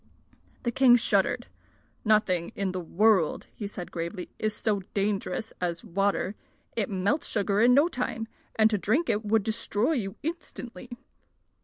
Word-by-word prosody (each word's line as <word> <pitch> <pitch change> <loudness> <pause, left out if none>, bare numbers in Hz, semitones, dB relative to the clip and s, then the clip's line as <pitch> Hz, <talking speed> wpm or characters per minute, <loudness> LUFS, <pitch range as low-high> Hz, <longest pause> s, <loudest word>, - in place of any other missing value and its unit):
The 240 - 0
king 250 0 +6
shuddered. 235 - +1 0.6
"Nothing 210 -6 +2
in 195 -2 -1
the 185 - -3
world," 185 0 +2 0.2
said 185 -3 -7
he - - -33
gravely, 170 +2 -4
"is 215 -1 -1
so 215 -4 0 0.2
dangerous 205 +2 -1
as 170 +1 -2
water. 200 -1 0 0.4
It 215 -4 0
melts 200 +10 0
sugar 205 -1 +1
in 245 +2 +6
no 290 +4 +6
time, 250 -7 -3 0.3
and 220 -1 +6
to 210 - +1
drink 255 - +1
it 210 +1 -1
would 215 0 +2
destroy 220 +3 0
you 210 -9 -2
instantly." 290 -7 -6
210 Hz, 150 wpm, -28 LUFS, 195-235 Hz, 0.6 s, king